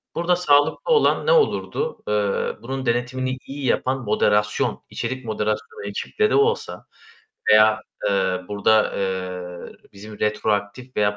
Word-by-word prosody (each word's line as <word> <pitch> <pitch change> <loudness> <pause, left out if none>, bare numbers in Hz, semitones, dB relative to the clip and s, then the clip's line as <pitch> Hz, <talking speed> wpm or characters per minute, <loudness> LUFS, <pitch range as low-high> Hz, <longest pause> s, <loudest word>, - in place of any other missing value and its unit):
Burada 175 +1 +2
sağlıklı 160 - +2
olan 450 - +3
ne - - +5
olurdu? 475 0 +1
Eee, 105 -1 0
bunun 130 +2 -5
denetimini 130 +2 -1
iyi 140 0 -6
yapan 130 +1 0
moderasyon, 105 0 +1
içerik 130 -1 -4
moderasyonu 110 -1 -3
ekiple 430 - -1
de - - +1
olsa 445 +3 0 0.7
veya, 110 0 +6 0.3
eee, 95 -2 +1
burada, 105 +1 +2
eee, 90 -2 -4 0.2
bizim 105 +1 -11
retroaktif 105 +3 -2
veya 105 -1 +1
110 Hz, 125 wpm, -22 LUFS, 105-135 Hz, 0.7 s, veya